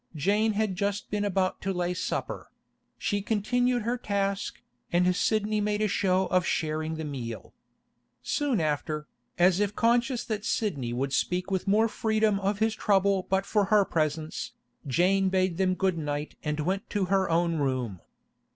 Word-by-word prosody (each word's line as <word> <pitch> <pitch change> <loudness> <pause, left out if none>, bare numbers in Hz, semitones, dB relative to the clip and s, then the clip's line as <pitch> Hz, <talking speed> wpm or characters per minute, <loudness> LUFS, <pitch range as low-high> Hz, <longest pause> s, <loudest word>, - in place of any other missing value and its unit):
Jane 210 +8 +2
had 210 -2 0
just 200 +2 -2
been 205 0 0
about 190 -2 0
to 195 - -1
lay 180 -1 -1
supper; 180 - -4 0.5
she 205 -1 -1
continued 245 +4 +1
her 240 +2 -1
task, 200 -2 -2 0.3
and 180 +1 +3
Sidney 215 0 +1
made 210 0 0
a 215 - +2
show 190 -2 +2
of 185 -1 +3
sharing 155 -1 -1
the 160 0 -4
meal. 125 -6 -6 0.7
Soon 285 - 0
after, 150 0 -2 0.3
as 180 +1 +4
if 205 0 0
conscious 240 +1 +2
that 215 -2 -3
Sidney 145 - -1
would 135 +3 -2
speak 180 +5 0
with 190 +1 -1
more 215 +3 +4
freedom 220 -2 +1
of 200 +1 0
his 220 +1 +1
trouble 200 -3 +2
but 190 +1 +1
for 205 -1 +2
her 205 0 +4
presence, 160 +7 -2 0.3
Jane 190 +8 +3
bade 185 -2 +1
them 185 -1 +2
good 185 -3 0
night 145 0 -3
and 150 0 -1
went 190 +6 -2
to 205 -2 0
her 190 -2 +2
own 170 0 +2
room. 130 - -1
195 Hz, 165 wpm, -28 LUFS, 165-210 Hz, 0.7 s, as